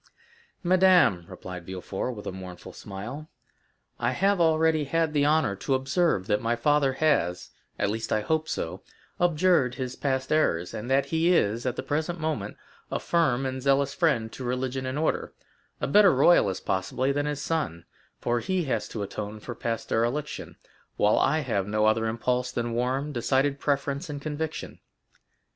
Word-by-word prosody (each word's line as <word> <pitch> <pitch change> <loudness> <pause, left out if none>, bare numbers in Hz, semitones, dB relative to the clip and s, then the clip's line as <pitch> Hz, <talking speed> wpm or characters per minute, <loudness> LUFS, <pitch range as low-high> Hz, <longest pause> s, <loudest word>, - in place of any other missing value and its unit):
"Madame," 180 - +4
replied 90 -1 -8
Villefort, 95 +6 -4
with 105 - -9
a - - -3
mournful 90 -2 -9
smile, 120 +11 -8 0.7
"I - - 0
have 195 -1 +2
already 160 -1 +3
had 165 +2 0
the 145 -1 +3
honor 150 -9 +2
to 135 +7 0
observe 135 - +1
that 105 +1 +1
my 115 +1 +1
father 140 +2 +2
has—at 130 - -1
least, 110 +2 -3
I 110 - +2
hope 160 +6 -1
so—abjured 160 - 0
his 130 -1 -4
past 130 -2 -2
errors, 90 - +1
and 110 +4 -5
that 135 +1 +3
he 165 +2 +2
is, 115 -1 +1
at 125 - -1
the - - -4
present 155 +5 -2
moment, 155 -2 -3 0.3
a - - -1
firm 135 -7 +1
and 130 0 -3
zealous 140 +1 +2
friend 125 -10 +1
to 130 - -8
religion 130 +1 -2
and 130 +2 -3
order—a 155 +1 -4
better 200 +6 +6
royalist, 130 - +4
possibly, 100 +8 0
than 145 +1 -1
his 145 -1 -3
son; 110 - -2 0.3
for 120 0 0
he 185 +5 -1
has 135 - -1
to 105 - -4
atone 105 +1 -6
for 120 - -7
past 115 -1 -4
dereliction, 120 +7 -2 0.4
while 105 - +3
I 155 +3 +2
have 100 -8 -1
no 105 +1 +1
other 110 +1 +2
impulse 125 +2 -1
than 120 -2 -2
warm, 130 +5 -1
decided 135 +2 +1
preference 140 0 -1
and 145 -1 -4
conviction." 155 +2 -5
130 Hz, 160 wpm, -27 LUFS, 110-155 Hz, 0.7 s, better